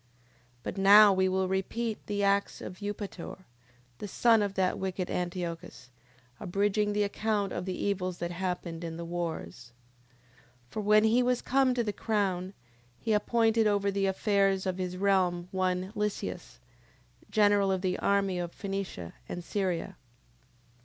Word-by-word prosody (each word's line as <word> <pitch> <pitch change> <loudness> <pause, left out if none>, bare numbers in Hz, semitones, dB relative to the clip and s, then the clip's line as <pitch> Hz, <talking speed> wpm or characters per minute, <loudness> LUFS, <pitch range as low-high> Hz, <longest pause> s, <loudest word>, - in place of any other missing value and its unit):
10:10. - - -35
But - - -5
now 205 +1 +8
we 190 0 +2
will 190 0 +1
repeat 210 +4 -2
the 205 -1 -1
acts 200 0 +1
of 185 - -8
Eupator, 205 -3 -6 0.6
the 210 - -5
son 225 +2 +4
of 200 -1 -2
that 185 -1 +1
wicked 185 -1 -3
Antiochus, 175 -5 -4 0.5
abridging 205 +3 0
the 205 0 +2
account 205 -1 -1
of 180 - -3
the 185 -1 -3
evils 185 -3 -1
that 175 0 -3
happened 175 -2 -4
in 165 -1 -5
the 170 - -5
wars. 160 - -5 1.0
10:11. - - -32
For 215 - -3
when 210 +1 +5
he 225 +3 +4
was 250 0 +1
come 265 -1 +2
to 240 - +1
the 210 -2 -2
crown, 195 -4 -1 0.4
he 225 - -1
appointed 225 +1 +2
over 200 -1 +1
the 195 0 0
affairs 195 -1 +1
of 185 0 -2
his 180 -1 -3
realm 185 -3 +1
one 185 0 -1
Lysias, 210 -1 -4 0.7
general 205 -2 +3
of 190 -1 0
the 185 -1 0
army 195 -2 +1
of 175 -1 -3
Phenicia 195 - -5 0.2
and 175 - -5
Syria. 185 -2 -2
195 Hz, 155 wpm, -29 LUFS, 180-205 Hz, 1.0 s, now